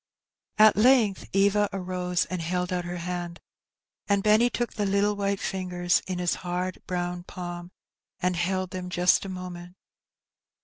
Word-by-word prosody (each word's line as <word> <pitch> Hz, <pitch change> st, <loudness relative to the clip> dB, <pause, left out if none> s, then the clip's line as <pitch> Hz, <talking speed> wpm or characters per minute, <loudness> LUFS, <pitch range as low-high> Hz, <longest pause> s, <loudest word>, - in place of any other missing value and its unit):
At 215 Hz, 0 st, +7 dB
length 220 Hz, -3 st, +3 dB
Era 200 Hz, +1 st, +3 dB
uose 180 Hz, -2 st, -1 dB
and 185 Hz, -2 st, -2 dB
held 180 Hz, +2 st, -2 dB
ont 180 Hz, -1 st, -2 dB
her 175 Hz, 0 st, -4 dB
hand, 175 Hz, 0 st, -5 dB, 0.7 s
and 200 Hz, -1 st, +2 dB
Benn; 215 Hz, 0 st, +5 dB
'^■.^:.^& 240 Hz, +1 st, +3 dB
took 240 Hz, -1 st, -2 dB
the 205 Hz, -2 st, -1 dB
little 200 Hz, +1 st, +2 dB
white 200 Hz, -1 st, -1 dB
fingers 180 Hz, -1 st, 0 dB
in 185 Hz, -1 st, -3 dB
his 180 Hz, -1 st, +1 dB
hard 180 Hz, +1 st, -3 dB
browQ 175 Hz, 0 st, -3 dB
palm, 175 Hz, -1 st, -7 dB, 0.5 s
and 180 Hz, 0 st, 0 dB
held 185 Hz, +1 st, -1 dB
them 180 Hz, -1 st, -5 dB
just 180 Hz, 0 st, +3 dB
for -, -, -6 dB
a -, -, -5 dB
moment. 180 Hz, -1 st, -8 dB
180 Hz, 165 wpm, -26 LUFS, 175-200 Hz, 0.7 s, At